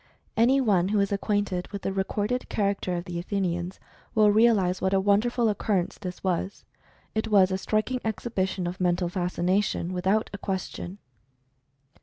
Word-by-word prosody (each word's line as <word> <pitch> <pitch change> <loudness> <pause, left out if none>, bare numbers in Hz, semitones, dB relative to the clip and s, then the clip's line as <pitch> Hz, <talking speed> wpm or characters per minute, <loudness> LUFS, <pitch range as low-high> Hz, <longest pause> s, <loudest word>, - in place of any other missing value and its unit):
Any 250 +4 +4
one 195 -8 +3
who 205 +1 +1
is 200 0 +1
acquainted 200 -2 -1
with 200 -1 -7
the 195 - -1
re 190 0 +1
corded 210 +6 -2
character 200 -3 0
of 175 +1 -4
the 175 -1 -4
Athenians 180 -1 -2 0.4
will 210 -1 +6
realize 205 -4 +3
what 190 +1 +2
a - - +4
wonderful 220 +5 +2
occurrence 200 -3 0
this 185 -3 -7
was. 185 +1 -2 0.5
It 220 +1 -1
was 195 -3 +5
a 190 - +1
striking 215 +6 -1
ex 220 +1 -3
hibition 190 -5 -1
of 180 +2 -5
Mental 175 0 +1
Fascination, 180 +1 0
without 190 +4 +1
a 200 - -5
question. 190 -1 -4
195 Hz, 165 wpm, -26 LUFS, 180-210 Hz, 0.5 s, will